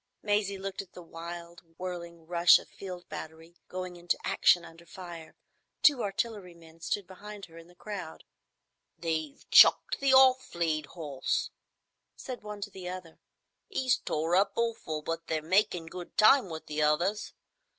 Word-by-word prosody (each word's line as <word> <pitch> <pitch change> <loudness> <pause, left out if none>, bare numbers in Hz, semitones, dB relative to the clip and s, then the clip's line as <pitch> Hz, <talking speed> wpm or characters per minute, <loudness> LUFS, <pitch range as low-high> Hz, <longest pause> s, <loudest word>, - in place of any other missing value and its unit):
Maisie 205 -1 +1
looked 195 0 -4
at 195 - -16
the 180 - -10
wild 170 +1 -9 0.2
whirling 170 -2 -7
rush 170 +1 +6
of - - -11
a - - -27
field 180 -2 -8
battery 160 +2 -9
going 185 -1 -6
into 175 0 -1
action 175 - +4
under 165 +1 -14
fire. 170 -2 -10 0.5
Two 285 -5 +6
artillery 200 -3 -3
men 165 -1 -17
stood 200 +3 -2
behind 200 +2 -10
her 165 - -18
in 165 - -14
the 175 - -20
crowd. 185 -4 -7 0.7
"They've 160 -3 -3
chucked - - +7
the 275 -1 +3
off 260 -3 +5
lead 155 -3 0
'orse' 145 -6 -2 0.6
said 255 -2 -7
one 210 -1 -8
to 205 +1 -5
the 185 -2 -7
other. 180 -3 -8 0.5
"'E's 260 -10 +1
tore 160 +3 -1
up 195 +2 +3
awful, 225 -10 -2
but 165 +1 -4
they're 160 - 0
makin' 180 -1 +2
good 175 +2 -9
time 215 0 +6
with 160 -1 -7
the 150 0 -3
others. 175 +8 +1
175 Hz, 160 wpm, -30 LUFS, 165-200 Hz, 0.7 s, chucked